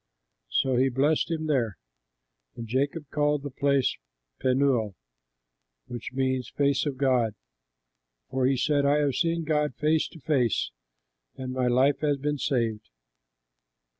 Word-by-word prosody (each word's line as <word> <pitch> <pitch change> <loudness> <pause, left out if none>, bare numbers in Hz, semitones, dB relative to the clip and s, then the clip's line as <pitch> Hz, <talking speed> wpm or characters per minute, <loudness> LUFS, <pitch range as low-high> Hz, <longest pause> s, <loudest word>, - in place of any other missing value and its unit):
So 130 -2 +1
he 130 +2 +3
blessed 145 +7 +1
him 160 -1 -2
there. 125 -9 0 0.8
And 115 - -7
Jacob 140 +6 -1
called 150 -1 +1
the 145 - -5
place 140 0 +1 0.4
Penuel, 130 -6 +1 0.9
which 120 -2 -7
means 130 -2 -1
Face 140 0 +1
of 140 -2 -3
God, 125 -5 +2 1.0
for 130 -1 +1
he 135 0 +2
said, 145 +2 +2
"I 140 +1 +3
have 145 -2 +1
seen 170 +2 0
God 150 -1 0
face 155 +1 +1
to 165 - -14
face, 125 - +1 0.6
and 130 -1 -5
my 130 -1 0
life 130 +3 +3
has 145 -2 +1
been 145 +1 -2
saved." 115 -6 -1
135 Hz, 135 wpm, -27 LUFS, 125-150 Hz, 1.0 s, he